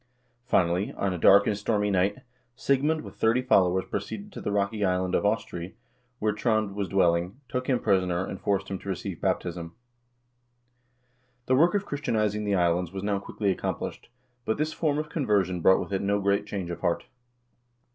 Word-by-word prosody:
Finally, 90 -3 +2
on 100 -2 -1
a - - -3
dark 100 +4 +7
and 105 - +1
stormy 105 0 0
night, 100 +5 +1 0.3
Sigmund 145 +5 +1
with - - -11
thirty 115 +3 +2
followers 95 -6 +3
proceeded 205 0 -5
to - - -8
the - - -2
rocky 100 +1 0
island 90 -1 0
of - - +2
Austrey, 95 -3 -3 0.4
where 105 -2 0
Trond 110 -1 0
was 100 -1 -2
dwelling, 90 +3 +1
took 125 0 -3
him 125 -2 +2
prisoner, 95 -3 +1
and 95 - -7
forced 100 -1 0
him 95 -1 -4
to 100 - -8
receive 95 -1 -4
baptism. 85 -1 -2 1.7
The 130 - +1
work 170 +8 +4
of 200 0 0
Christianizing 110 - -1
the 100 -1 +1
islands 85 -1 +1
was 95 0 -6
now 100 -1 0
quickly 100 0 -1
accom - - -2
plished, - - -7 0.4
but 110 - -1
this 155 +1 -1
form 150 -3 0
of 155 0 -2
conversion 100 - 0
brought 95 - +5
with - - -5
it 95 - 0
no 100 +1 +1
great 100 0 +1
change 95 -4 -4
of 85 - -5
heart. 85 -1 -1
100 Hz, 185 wpm, -27 LUFS, 95-110 Hz, 1.7 s, dark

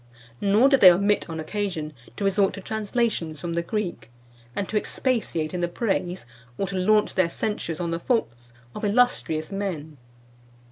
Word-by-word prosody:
Nor 205 +6 +5
did 275 -2 +4
they 185 - +11
omit, 200 +2 +1
on 160 -1 -4
occasion, 160 -3 -3 0.2
to 205 - -3
resort 195 0 +2
to 195 - -7
translations 215 -6 -1
from 170 +2 -4
the 170 - 0
Greek, 175 - -4 0.5
and 200 - -2
to - - -5
expatiate 210 -8 -1
in 180 - -2
the 175 - +1
praise, 180 - -2 0.3
or 195 - 0
to 195 0 -5
launch 210 +3 +3
their 185 -3 +2
censures 170 -4 -3
on 170 -1 -2
the 165 - -1
faults, 120 - -2 0.2
of - - -7
illustrious 205 -8 +1
men. 165 -7 -4
190 Hz, 170 wpm, -25 LUFS, 165-210 Hz, 0.5 s, they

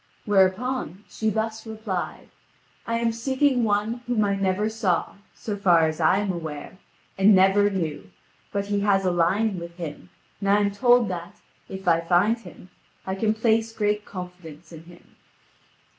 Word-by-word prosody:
Whereupon, 200 - +1
she 220 - -2
thus 220 +1 -3
replied: 215 -4 -5 0.6
"I 230 0 0
am 230 0 +1
seeking 260 +2 +1
one 215 +3 0
whom 230 -4 +1
I 200 - +1
never 195 +1 0
saw, 220 -5 -1 0.2
so 210 - -5
far 175 -5 +4
as 155 0 -2
I 160 +4 +4
am 205 -1 0
aware, 165 +1 -7 0.4
and 200 +1 +6
never 195 +2 +4
knew; 155 - -4 0.4
but 200 -1 -2
he 205 0 -1
has 200 -1 +2
a 180 - +2
lion 185 +4 +1
with 170 0 -9
him, 165 0 -7 0.3
and 195 0 -2
I 200 - +5
am 205 -1 +1
told 240 +2 +4
that, 175 -2 -6 0.3
if 190 -1 -8
I 165 -1 +4
find 180 +7 +2
him, 185 -5 -14 0.3
I 190 - -2
can 215 +3 0
place 225 0 +1
great 210 -1 0
confidence 180 -5 -10
in 165 -1 -11
him." 175 0 -18
200 Hz, 165 wpm, -24 LUFS, 180-220 Hz, 0.6 s, and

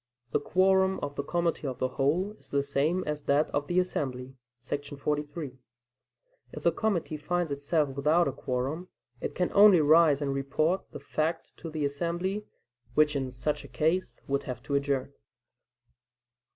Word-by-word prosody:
The - - +2
quorum 190 0 +3
of 145 0 -3
the - - -1
committee 170 -1 -1
of 130 - -4
the 130 - 0
whole 160 +11 +1
is - - -16
the 140 0 +1
same 145 +6 +1
as 150 0 -2
that 145 +2 +2
of 145 0 -1
the 175 +1 +2
assembly 130 -7 -2 0.3
[§ 145 +2 -4
43]. 150 -2 -3 0.9
If - - -7
the - - +4
committee 180 -8 -1
finds 175 +1 -1
itself 145 +1 +1
without 150 +5 +2
a - - 0
quorum, 135 +6 -3 0.3
it - - -4
can 180 - 0
only 200 -3 +8
rise 155 -1 +5
and 140 -2 -1
report 145 +6 0
the - - -7
fact 160 +2 -2
to 165 - -7
the 155 -2 -2
assembly, 175 +8 -2 0.5
which 150 -1 +4
in 135 -2 -1
such 130 +4 -2
a - - -10
case 160 -5 0
would 140 0 0
have 125 -2 -5
to 140 - -4
adjourn. 140 -1 0
150 Hz, 165 wpm, -29 LUFS, 140-175 Hz, 0.9 s, only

